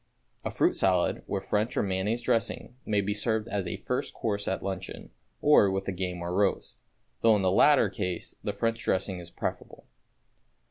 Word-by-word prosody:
A - - -2
fruit - - +2
salad, - - +2
with 95 -1 -3
French 105 +5 0
or - - +3
mayonnaise 100 +5 -1
dressing, 115 +1 -1
may 105 -1 +2
be 100 +1 -1
served 110 +1 0
as 100 -4 -2
a 85 - -3
first - - -3
course 100 -2 -2
at 95 - -1
luncheon, 95 -1 -5 0.3
or 145 -9 +6
with 95 0 -2
the - - -2
game 90 -1 -4
or 85 +1 -3
roast, 100 +1 0 0.4
though 115 -1 +6
in 100 - 0
the 95 - +3
latter 145 +9 +5
case 90 -5 -4
the 105 - -1
French 115 +3 -1
dressing 95 0 0
is 85 -1 -8
preferable. - - -5
100 Hz, 185 wpm, -28 LUFS, 95-110 Hz, 0.4 s, or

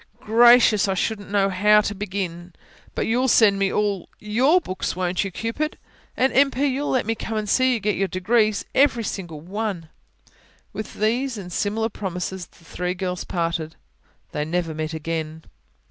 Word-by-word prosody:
"Gracious! 230 -2 +5
I 195 - 0
shouldn't 205 +2 -2
know 200 -1 +2
how 210 +3 +5
to 205 - -3
begin. 185 -3 -5 0.4
But - - -1
you'll 250 +3 +1
send 210 -5 +5
me 195 -1 +1
all 205 -3 -1
you 210 +3 -3
write - - +5
all - - +6
YOUR 365 - +5
books 185 - -4
won't 180 0 -1
you, 195 - -3
Cupid? 230 - -3 0.4
And, 260 +1 +2
M. 275 +1 +5
P., 275 +2 -1
you'll 280 +1 -1
let 255 -4 +1
me 225 - 0
come 225 0 -4
and 215 -1 -2
see 255 +4 +3
you - - -2
get 210 0 0
your 195 - 0
degrees 215 +3 +1
every 260 -4 +3
single 175 -7 -5
one." 190 -2 -4 0.8
With 215 - -6
these 235 +4 0
and 180 -3 -8
similar 220 +4 -1
promises 185 -2 -5
the 170 - -23
three 180 +2 -3
girls 180 -1 -3
parted. 165 -2 -2 0.6
They 150 - -2
never 165 +1 -2
met 155 +1 -4
again. 160 0 -4
200 Hz, 185 wpm, -23 LUFS, 180-225 Hz, 0.8 s, all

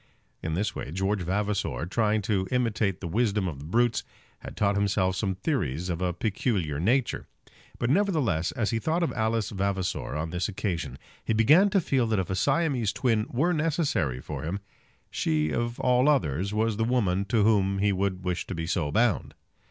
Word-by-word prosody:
In 80 0 -2
this 100 +5 -1
way - - -5
George 95 +3 -1
Vavasor, 100 -1 -1
trying 105 +2 +1
to 95 -2 0
imitate 115 -6 0
the 90 - -4
wisdom 105 0 +1
of 75 -6 -5
the 70 - -9
brutes, 115 +7 +1 0.4
had - - -10
taught 100 -1 +2
himself 100 -2 +1
some 95 -1 -1
theories 90 - -2
of 85 0 -2
a 90 -1 +1
peculiar 95 - -1
nature. 115 - +1 0.5
But, 120 - 0
nevertheless, 150 - +1
as 110 -1 -1
he 115 - 0
thought 160 +8 0
of 170 - -1
Alice 110 -1 0
Vavasor 95 -5 -2
on 80 +1 -3
this 90 +4 -1
occasion, 95 -4 -3 0.3
he - - 0
began 150 - +5
to 200 0 +3
feel 135 -8 +1
that 110 -1 +1
if 95 -1 -1
a - - 0
Siamese 135 - +1
twin 115 -2 +1
were 155 +9 +1
necessary 150 - 0
for - - -6
him, 85 +6 -3 0.5
she 75 -1 0
of 120 +5 -2
all 125 +3 +3
others 95 - +1
was 110 0 0
the 115 - +1
woman 105 -6 +1
to 110 -1 +2
whom 100 -3 +3
he 100 +1 +2
would 95 -1 -1
wish 90 -1 -2
to 95 - -4
be 80 0 -3
so 80 -4 -1
bound. 115 +1 +1
105 Hz, 190 wpm, -27 LUFS, 90-120 Hz, 0.5 s, began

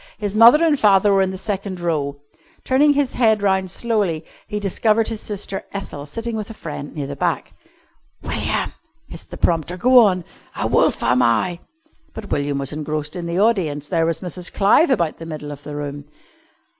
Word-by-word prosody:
His 205 -1 -4
mother 240 +9 +7
and 300 -4 +2
father 200 -1 +4
were 195 - +4
in 190 - +1
the 190 - -5
second 195 -1 -4
row. 150 -5 -2 0.5
Turning 290 +3 +4
his 285 -2 0
head 220 -4 +2
round 190 -1 +1
slowly 195 -7 -1 0.2
he 210 -1 -3
discovered 215 +3 +1
his 225 -2 -5
sister 200 -2 -4
Ethel 150 -7 -6
sitting 230 +8 -5
with 215 -1 -4
a 225 - -9
friend 145 -5 -7
near 145 -3 -3
the 140 +1 -6
back. - - -2 0.7
"William," - - -2 0.3
hissed - - -10
the - - -8
prompter, 170 +1 0
"go 250 +6 +6
on! 190 -6 +3 0.4
'A - - 0
wolf - - +2
am 125 +1 +3
I 125 +10 +1 0.3
'" 315 - -38
But 215 -2 -8
William 145 -1 -1
was 140 +1 -3
engrossed 150 +1 -4
in 175 -1 -4
the 170 +1 -2
audience. 165 -10 +1
There 165 -2 +1
was 165 -1 -1
Mrs. 180 -1 -3
Clive 210 - +4
about 170 - 0
the 165 - -8
middle 150 -2 -6
of 145 -1 -9
the 145 +1 -8
room. 145 -1 -5
185 Hz, 195 wpm, -20 LUFS, 150-215 Hz, 0.7 s, mother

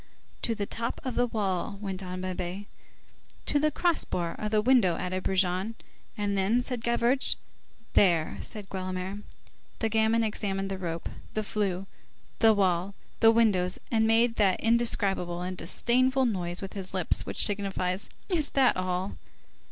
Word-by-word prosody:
"To 230 - -1
the 205 -2 -2
top 230 +3 -3
of 255 - -3
the 245 +1 +2
wall," 200 -2 -2
went 195 -2 -5
on 185 -1 -5
Babet. 185 +1 -4 0.8
"To 290 - +1
the 305 +1 +3
cross 340 +2 +1
bar 170 -2 -2
of 210 - -2
the 215 0 +2
window," 220 -6 +4
added 185 +1 -3
Brujon. 190 +3 0 0.4
"And 205 -1 -1
then?" 205 +6 +2
said 245 -3 -3
Gavroche. 235 +3 +2 0.6
"There!" 170 -5 +3
said 210 -2 -6
Guelemer. 185 +1 -4 0.6
The 225 - 0
gamin 220 +1 +2
examined 195 -3 -2
the 190 - -4
rope, 170 -2 -4 0.3
the 215 - 0
flue, 195 -3 -2 0.5
the 225 -1 +6
wall, 190 0 +1 0.2
the 225 - +7
windows, 205 -6 +3
and 220 -1 +3
made 230 +1 +3
that 195 -4 +3
indescribable 200 -6 +1
and 185 +1 -4
disdainful 255 +9 +2
noise 180 -5 -2
with 195 - -6
his 190 -1 -4
lips 185 -3 +1
which - - +4
signifies:— 195 -2 -1 0.2
"Is 330 -7 +1
that 260 -2 +5
all!" 185 +1 -2
200 Hz, 155 wpm, -28 LUFS, 185-230 Hz, 0.8 s, the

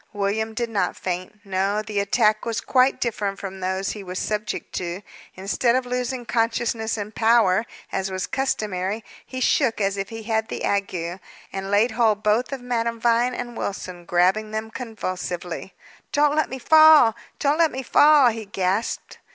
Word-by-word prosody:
William 210 +2 -1
did 235 0 -2
not 195 -5 0
faint. 185 +3 -5
No; 195 +2 0
the 210 -1 -2
attack 210 +2 +2
was 230 -1 -2
quite 260 0 +2
different 205 -4 -2
from 190 -1 -7
those 190 +1 -2
he 210 - -7
was 185 0 -6
subject 210 +1 -3
to. 180 +2 -4 0.3
Instead 205 +6 +1
of 255 0 0
losing 250 0 -3
consciousness 230 -1 0
and 210 +1 -5
power, 220 -2 +3 0.2
as 190 0 -2
was 185 -1 -3
customary, 215 -5 -2 0.2
he 255 - -7
shook 255 -2 +2
as 200 -1 0
if 195 0 -3
he 225 -1 -7
had 220 0 0
the - - -5
ague, 185 -3 -2 0.3
and 195 0 -4
laid 210 +5 +3
hold 220 -2 +2
both 215 +5 +2
of 270 -2 -4
Madame 235 -2 -2
Vine 240 +2 +2
and 240 -1 -6
Wilson, 185 -4 -5
grasping 185 +5 +2
them 220 +1 -4
convulsively. 185 -6 -5 0.4
"Don't 295 0 +3
let 310 - +1
me 265 - -5
fall! 310 -4 +7 0.2
Don't 295 +2 +1
let 330 -2 +4
me 265 +1 -5
fall!" 290 0 +6
he 225 -1 -5
gasped. 195 +2 -2
215 Hz, 170 wpm, -23 LUFS, 195-240 Hz, 0.4 s, fall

